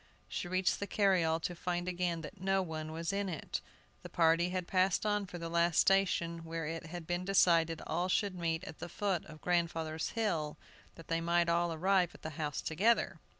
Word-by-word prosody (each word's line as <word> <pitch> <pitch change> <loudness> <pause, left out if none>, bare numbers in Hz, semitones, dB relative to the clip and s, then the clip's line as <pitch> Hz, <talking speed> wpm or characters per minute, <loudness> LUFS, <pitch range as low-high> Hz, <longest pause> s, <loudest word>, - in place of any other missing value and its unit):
She - - -4
reached 185 +1 +1
the 200 - -3
carryall 180 -6 +2
to 175 - -2
find 175 +1 -2
again 175 -2 -1
that 170 +5 -10
no 195 0 +2
one 155 -2 -5
was 165 +3 -3
in 200 -1 -1
it. 160 -5 -4 0.4
The - - -9
party 165 +1 +3
had 180 -1 -2
passed 185 +3 +2
on 205 -1 +1
for 180 - -7
the 170 -1 -5
last 170 -1 +2
station, 175 -3 +3
where 165 0 -4
it 165 +1 -5
had 175 0 -7
been 175 +2 -2
decided 170 -4 +3
all 175 +3 -1
should 200 +1 +1
meet 165 -1 -2
at 185 - -9
the 175 - -6
foot 190 -1 -1
of 155 -1 -12
grandfather's 165 -2 0
hill, 165 -9 0 0.4
that 165 - -13
they 165 0 0
might 170 0 +2
all 170 0 +2
arrive 180 +2 +2
at - - -16
the 155 - -4
house 150 0 -3
together. 195 0 +1
175 Hz, 200 wpm, -33 LUFS, 165-185 Hz, 0.4 s, party